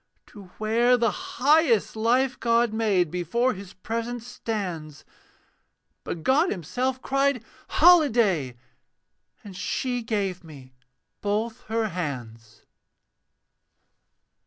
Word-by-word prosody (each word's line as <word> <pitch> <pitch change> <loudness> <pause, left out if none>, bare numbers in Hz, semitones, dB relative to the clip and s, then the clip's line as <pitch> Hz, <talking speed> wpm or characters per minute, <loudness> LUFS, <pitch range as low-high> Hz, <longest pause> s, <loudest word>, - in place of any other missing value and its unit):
To 205 -2 -13
where 235 +3 +3
the 230 -2 +2 0.3
highest 280 - +3
life 250 +4 +1
God 235 -1 +2
made 200 -7 +1
Before 235 +9 0
His 190 -1 -11
presence 230 +4 -4
stands; 180 -11 -5 1.0
But 165 - -5
God 295 +7 +3
himself 250 - -2
cried, 275 -2 +1 0.2
'Holiday!' 230 - +4 0.9
And 200 -3 -10
she 245 +6 -2
gave 200 -5 -2
me 135 -5 -13 0.5
both 220 +3 -2
her 220 0 -1
hands. 120 - -6
220 Hz, 95 wpm, -25 LUFS, 180-245 Hz, 1.0 s, Holiday